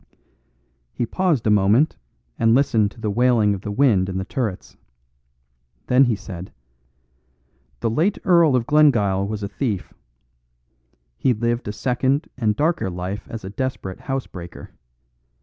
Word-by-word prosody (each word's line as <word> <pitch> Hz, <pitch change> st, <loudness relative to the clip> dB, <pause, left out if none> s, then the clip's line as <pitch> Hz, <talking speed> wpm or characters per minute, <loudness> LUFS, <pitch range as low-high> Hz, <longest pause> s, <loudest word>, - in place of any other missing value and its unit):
He 120 Hz, -, -1 dB
paused 165 Hz, -2 st, 0 dB
a 105 Hz, -, +3 dB
moment 105 Hz, +9 st, +3 dB, 0.4 s
and 115 Hz, 0 st, +4 dB
listened 115 Hz, -6 st, +2 dB
to 115 Hz, -, -18 dB
the 110 Hz, -2 st, -2 dB
wailing 115 Hz, -2 st, +3 dB
of 95 Hz, -, -5 dB
the 105 Hz, -, -6 dB
wind 100 Hz, -5 st, +2 dB
in 95 Hz, -, -3 dB
the 95 Hz, -, -3 dB
turrets. 110 Hz, -8 st, -4 dB, 1.1 s
Then 130 Hz, +2 st, +4 dB
he 120 Hz, -3 st, +1 dB
said, 95 Hz, -3 st, -9 dB, 1.3 s
"The -, -, +1 dB
late 170 Hz, -, +1 dB
Earl 170 Hz, -7 st, +4 dB
of 120 Hz, -2 st, +1 dB
Glengyle 115 Hz, -10 st, +3 dB
was 105 Hz, 0 st, -4 dB
a -, -, -2 dB
thief. 105 Hz, -3 st, -3 dB, 1.3 s
He 130 Hz, -3 st, +2 dB
lived 120 Hz, +1 st, -1 dB
a -, -, -2 dB
second 130 Hz, +6 st, 0 dB
and 110 Hz, -4 st, 0 dB
darker 155 Hz, -, 0 dB
life 90 Hz, +3 st, -5 dB
as 115 Hz, -3 st, -7 dB
a 95 Hz, -, -6 dB
desperate 130 Hz, -6 st, -4 dB
housebreaker. 95 Hz, -11 st, -6 dB
115 Hz, 145 wpm, -22 LUFS, 100-135 Hz, 1.3 s, and